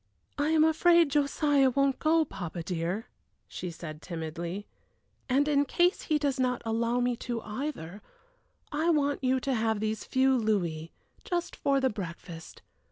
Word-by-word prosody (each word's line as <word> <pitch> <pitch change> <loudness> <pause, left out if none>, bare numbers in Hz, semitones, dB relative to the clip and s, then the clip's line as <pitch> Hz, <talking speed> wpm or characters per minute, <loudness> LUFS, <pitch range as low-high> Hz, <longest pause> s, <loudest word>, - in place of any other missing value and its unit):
"I 290 +1 +2
am 315 -1 +4
afraid 330 0 +4
Josiah 285 -1 +3
won't 275 +1 +1
go, 320 0 +3
papa 175 - -6
dear," 175 +5 -2 0.4
she 180 - -6
said, 155 -2 -8
timidly; 170 +3 -5 0.6
"and 275 +3 +3
in 285 -1 +3
case 350 +6 +2
he 310 - +1
does 280 -2 -1
not 250 -1 0
allow 230 +2 0
me 245 0 +1
to 235 -1 -3
either, 210 - -5 0.7
I 315 +3 +1
want 285 -4 +1
you 260 0 +2
to 270 - -1
have 220 -2 0
these 215 0 -2
few 265 0 +3
louis, 175 -9 -1 0.3
just 350 -1 -2
for 275 -1 +1
the 265 -1 +1
breakfast. 170 -4 -8
250 Hz, 155 wpm, -29 LUFS, 195-290 Hz, 0.7 s, am